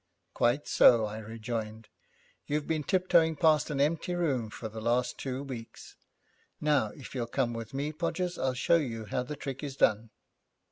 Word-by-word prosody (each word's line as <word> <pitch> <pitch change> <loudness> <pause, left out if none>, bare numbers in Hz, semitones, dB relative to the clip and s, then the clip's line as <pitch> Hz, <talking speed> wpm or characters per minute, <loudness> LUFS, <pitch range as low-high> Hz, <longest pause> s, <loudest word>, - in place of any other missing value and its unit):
'Quite 120 +5 +1
so,' 115 -3 +6
I 105 +1 -5
rejoined, 110 0 -5 0.6
'you've 150 0 -1
been 160 -2 -1
tiptoeing 170 -2 +3
past 155 -1 +3
an 145 -2 -2
empty 165 +4 +1
room 135 -10 0
for 110 - -6
the 110 +1 -8
last 120 +2 0
two 135 0 -3
weeks. 125 -5 -9 0.6
Now, 150 -7 +2
if 140 - -10
you'll 120 -3 -2
come 120 -1 0
with 115 -1 -6
me, 145 +3 -3
Podgers, 175 +3 -2
I'll 130 -1 0
show 170 +6 +3
you 115 -8 -3
how 115 +5 -2
the 145 +4 -5
trick 135 -1 -6
is 140 -2 -5
done.' 110 -3 +2
135 Hz, 175 wpm, -30 LUFS, 115-150 Hz, 0.6 s, so